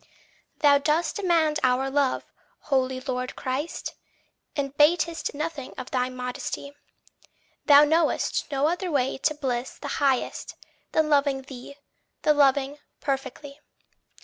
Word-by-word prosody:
8. - - -26
Thou 285 -1 +6
dost 315 +3 0
demand 330 -6 +2
our 255 +1 +2
love, 275 -1 0 0.4
holy 260 -2 0
Lord 255 -1 -3
Christ, 265 +5 -4 0.6
And 275 -1 -3
batest 330 +1 +2
nothing 305 -3 -5
of 255 - -7
thy 255 -1 0
modesty; 255 +2 -5 0.9
Thou 290 0 +9
know'st 315 -1 +1
no 280 +1 +2
other 355 +2 -1
way 270 -4 0
to 305 +2 +1
bliss 255 -3 -3
the 285 0 -5
highest 270 -3 0 0.4
Than 315 -1 +3
loving 280 -2 +2
thee, 265 +1 -10 0.5
the 300 - +5
loving, 280 0 +2 0.2
perfectly. 275 +1 -4
280 Hz, 125 wpm, -26 LUFS, 265-300 Hz, 0.9 s, Thou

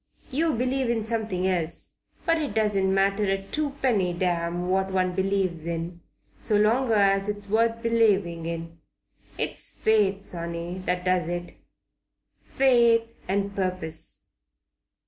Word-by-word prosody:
You 315 +4 +1
believe 255 +1 0
in 230 -2 0
something 220 -5 -2
else. 170 -3 -1 0.3
But 330 -1 +3
it 285 -9 -3
doesn't 205 -3 +2
matter 195 +2 +2
a 195 0 0
tuppenny 265 -11 0
damn 175 0 -1
what 190 +1 +1
one 185 -1 +1
believes 190 -3 -1
in, 170 +1 -4 0.4
so 215 - 0
long 230 +4 +3
as 195 -1 +3
it's 205 0 -4
worth 230 +2 +1
believing 200 -8 +2
in. 165 0 -6 0.6
It's - - -1
faith, 200 -3 +1
sonny, 170 0 -5
that 180 0 0
does 180 -3 +2
it. 175 0 -4 1.0
Faith 235 -4 +5 0.2
and 200 +1 -1
purpose." 185 -4 -3
195 Hz, 125 wpm, -26 LUFS, 175-225 Hz, 1.0 s, Faith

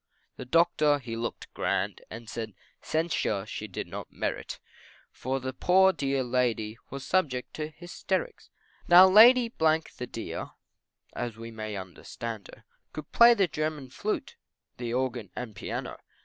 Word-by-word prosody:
The 130 - -8
Doctor 155 0 +3
he 120 -4 -6
looked 115 +1 -5
grand, - - -1
And 115 +1 -9
said 110 -3 -6 0.3
censure 155 - -1
she 110 0 -6
did 95 - -5
not - - -8
merit, - - -4 0.5
For 130 +1 -3
the 130 0 -5
poor 190 +6 +4
dear 135 -3 -1
Lady 120 -3 -1
Was 140 0 -7
subject 140 -9 0
to 155 -1 -2
hysterics. 175 - -4 0.4
Now 180 +2 +9
Lady, 235 +4 +7
the 160 -5 +1
dear, 115 - -5 0.6
As 120 -2 -4
we 115 0 -8
may 110 -1 -5
understand 100 +3 -7
her, - - -16 0.3
Could 155 -1 -8
play 235 0 +7
the 195 -4 +3
German 150 -3 -3
flute, 265 - -3 0.4
The 120 -2 -4
organ 125 -4 -2
and 120 -4 -6
piano. - - -5
130 Hz, 145 wpm, -28 LUFS, 115-170 Hz, 0.6 s, Now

